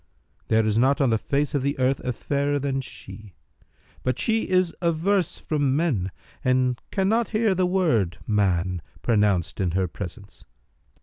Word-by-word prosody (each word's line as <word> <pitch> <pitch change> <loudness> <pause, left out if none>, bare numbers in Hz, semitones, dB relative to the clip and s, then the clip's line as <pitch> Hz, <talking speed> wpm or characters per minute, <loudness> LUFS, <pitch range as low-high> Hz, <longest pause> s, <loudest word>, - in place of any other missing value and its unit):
There 110 0 +3
is 110 +1 +2
not 135 +3 +3
on 135 -4 +3
the 110 - +2
face 140 +3 -1
of 145 - +1
the 140 +2 -1
earth 130 +1 +1
a 125 - -2
fairer 140 +4 -1
than 135 -1 -1
she; 95 - -11 0.7
but 130 - -1
she 225 0 0
is 185 -2 +2
averse 175 +2 +1
from 145 -4 0
men 135 - 0 0.3
and 130 -1 +1
cannot 215 +4 +1
hear 220 -3 +3
the 185 -1 +1
word 155 - +1
'man' 95 -4 +1 0.2
pronounced 105 -6 +1
in 90 -3 0
her 95 -1 +1
presence. 100 +2 -9
130 Hz, 160 wpm, -24 LUFS, 105-165 Hz, 0.7 s, There